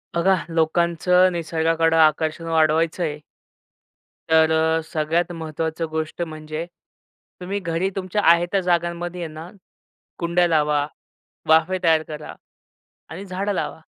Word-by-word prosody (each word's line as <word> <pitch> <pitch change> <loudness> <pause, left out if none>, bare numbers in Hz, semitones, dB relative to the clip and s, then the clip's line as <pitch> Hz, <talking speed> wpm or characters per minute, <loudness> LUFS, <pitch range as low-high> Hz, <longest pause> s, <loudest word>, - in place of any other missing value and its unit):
बघा 185 +3 +3
लोकांचं 170 +3 +2
निसर्गाकडं 165 0 +1
आकर्षण 155 +1 +2
वाढवायचंय 160 0 +1 1.1
तर 160 0 +4
अ, 160 0 +2
सगळ्यात 165 +3 0
महत्त्वाचं 160 0 -4
गोष्ट 160 +2 -4
म्हणजे. 155 0 -5 0.8
तुम्ही 195 +3 -3
घरी 170 +1 -1
तुमच्या 195 +1 -2
आहे 170 +1 +3
त्या 195 - +2
जागांमध्ये 175 0 -1
ना, 160 +2 -9 0.7
कुंड्या 175 +1 +2
लावा, 150 -3 +2 0.6
वाफे 160 +4 +4
तयार 160 -1 +3
करा, 150 -1 -8 0.8
आणि 175 +6 -8
झाडं 195 +2 -2
लावा. 180 - -3
165 Hz, 110 wpm, -22 LUFS, 160-175 Hz, 1.1 s, तर